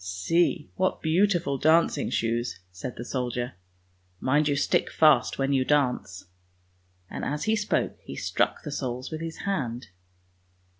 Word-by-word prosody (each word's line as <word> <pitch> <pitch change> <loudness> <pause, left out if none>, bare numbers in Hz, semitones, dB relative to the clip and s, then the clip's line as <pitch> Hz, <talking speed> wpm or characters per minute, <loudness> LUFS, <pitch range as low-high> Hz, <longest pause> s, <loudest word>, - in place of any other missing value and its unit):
" - - -13
See, 90 - 0
what 185 0 0
beautiful 170 -4 +2
dancing 160 -1 +3
shoes! 115 +1 -1
" 90 - -40
said 125 - -5
the 120 - -7
soldier. 125 -1 -3 0.4
" 90 0 -39
Mind 145 +2 +4
you 145 - +2
stick 140 - +1
fast 155 -2 +4
when 135 +1 +1
you 130 -1 +3
dance," 125 -11 0 0.8
and - - -6
as 150 +1 -2
he 220 0 +2
spoke 210 -1 -1
he - - -8
struck - - 0
the 150 - -5
soles 130 -1 -4
with 160 0 -5
his 165 0 -5
hand. 125 - -2
140 Hz, 160 wpm, -27 LUFS, 120-160 Hz, 0.8 s, Mind